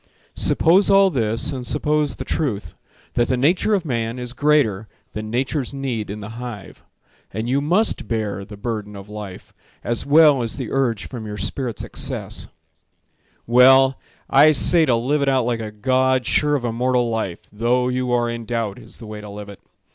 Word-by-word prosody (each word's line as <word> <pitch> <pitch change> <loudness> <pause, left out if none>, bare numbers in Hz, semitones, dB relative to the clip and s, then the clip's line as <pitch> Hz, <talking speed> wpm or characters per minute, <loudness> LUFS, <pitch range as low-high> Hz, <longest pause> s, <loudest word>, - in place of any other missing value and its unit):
Suppose 185 +6 +4
all 195 -1 +5
this, 115 -5 0
and 130 -3 -5
suppose 150 0 0
the - - -7
truth: 105 - -3 0.4
That 120 - +1
the 130 - 0
nature 180 +10 +2
of 185 -4 -2
man 115 -3 -2
is 125 -1 -6
greater 125 -8 +1 0.3
Than 110 0 -5
nature's 130 +3 -2
need 125 -7 -3
in 105 +1 -6
the 110 +3 -8
hive; 115 -6 -8 0.5
And 110 +3 -4
you 135 +3 +1
must 180 +10 +1
bear 105 -4 -3
the 105 +1 -11
burden 105 -1 -5
of 100 +1 -10
life, 105 -3 -9 0.3
As 120 -1 -2
well 150 -2 +5
as 115 +1 -2
the 130 -5 -5
urge 120 -6 0
from 115 -4 -7
your 105 0 -6
spirit's 120 +5 -4
excess— - - -3 1.0
Well, 130 +2 +5 0.3
I 150 +3 +6
say 160 +2 +4
to 120 - +3
live 135 +6 0
it 140 - +2
out 130 -3 +2
like 120 -1 -1
a 110 -1 -5
god 130 +4 +1
Sure 150 -1 +2
of 130 -4 -2
immortal 120 +1 0
life, 110 -6 -3
though 120 +4 +1
you 125 0 -1
are 120 -1 +1
in 115 -1 -5
doubt, 115 -2 -3
Is 115 -2 -12
the 115 - -11
way 105 -1 -8
to 105 - -10
live 100 0 -9
it. 100 - -11
120 Hz, 185 wpm, -21 LUFS, 110-135 Hz, 1.0 s, I